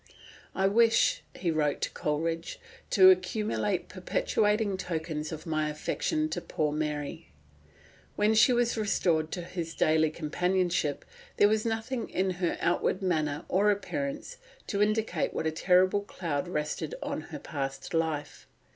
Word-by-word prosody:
"I 190 Hz, -, +1 dB
wish," 225 Hz, +3 st, +4 dB
he 175 Hz, -2 st, -1 dB
wrote 150 Hz, -2 st, 0 dB
to -, -, -1 dB
Coleridge, 165 Hz, +2 st, -2 dB, 0.3 s
"to 190 Hz, -1 st, +8 dB
accumulate 190 Hz, +1 st, 0 dB
perpetuating 210 Hz, +2 st, 0 dB
tokens 160 Hz, -4 st, -4 dB
of 160 Hz, +1 st, -7 dB
my 155 Hz, -2 st, 0 dB
affection 310 Hz, -, -1 dB
to -, -, -3 dB
poor 150 Hz, -1 st, -1 dB
Mary." 150 Hz, -1 st, -3 dB, 0.9 s
When 210 Hz, +1 st, +3 dB
she 220 Hz, +4 st, +6 dB
was 240 Hz, -1 st, +2 dB
restored 170 Hz, -6 st, +1 dB
to 175 Hz, -, -4 dB
his 170 Hz, -2 st, -5 dB
daily 155 Hz, 0 st, +3 dB
companionship, 175 Hz, 0 st, -1 dB, 0.3 s
there 205 Hz, -, +6 dB
was 215 Hz, +1 st, +1 dB
nothing 225 Hz, +2 st, -3 dB
in 190 Hz, +1 st, 0 dB
her 175 Hz, -, 0 dB
outward 175 Hz, +2 st, +1 dB
manner 155 Hz, -4 st, 0 dB
or 200 Hz, +3 st, +3 dB
appearance 280 Hz, -, -3 dB, 0.3 s
to 200 Hz, -, -1 dB
indicate 215 Hz, +1 st, 0 dB
what -, -, -2 dB
a 160 Hz, -, +1 dB
terrible 185 Hz, +4 st, +3 dB
cloud 170 Hz, -7 st, -3 dB
rested 150 Hz, -, -3 dB
on -, -, -3 dB
her -, -, -6 dB
past 135 Hz, -1 st, -5 dB
life. 160 Hz, -3 st, -2 dB
180 Hz, 140 wpm, -29 LUFS, 155-210 Hz, 0.9 s, to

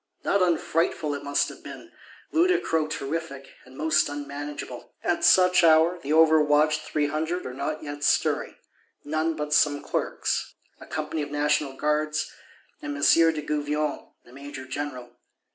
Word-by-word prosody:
Not 200 Hz, -, +1 dB
unfrightful 170 Hz, -3 st, 0 dB
it 145 Hz, 0 st, -6 dB
must 145 Hz, 0 st, +1 dB
have -, -, -12 dB
been; -, -, -10 dB, 0.4 s
ludicro 335 Hz, -, +2 dB
terrific, 140 Hz, -2 st, -5 dB
and 130 Hz, +1 st, -15 dB
most 155 Hz, -1 st, +2 dB
unmanageable. 145 Hz, -3 st, -7 dB
At 175 Hz, -, 0 dB
such 180 Hz, -1 st, +5 dB
hour 165 Hz, +2 st, +5 dB
the 145 Hz, -2 st, -5 dB
overwatched 155 Hz, -1 st, +4 dB
Three 150 Hz, -1 st, -1 dB
Hundred 160 Hz, +4 st, -2 dB
are 125 Hz, -, -5 dB
not 145 Hz, +4 st, -4 dB
yet 145 Hz, -1 st, -7 dB
stirring: -, -, +1 dB, 0.5 s
none 155 Hz, +2 st, -1 dB
but 150 Hz, -1 st, -3 dB
some 145 Hz, -1 st, +3 dB
Clerks, -, -, -2 dB, 0.2 s
a -, -, -12 dB
company 155 Hz, 0 st, -3 dB
of 145 Hz, -, -4 dB
National 145 Hz, -1 st, 0 dB
Guards; 150 Hz, +2 st, -1 dB, 0.5 s
and 295 Hz, -1 st, -5 dB
M. 305 Hz, -, -4 dB
de 165 Hz, -2 st, +4 dB
Gouvion, 150 Hz, 0 st, -2 dB, 0.2 s
the 120 Hz, -, -17 dB
Major 140 Hz, 0 st, -9 dB
general. 130 Hz, -2 st, -6 dB
150 Hz, 145 wpm, -25 LUFS, 145-160 Hz, 0.5 s, such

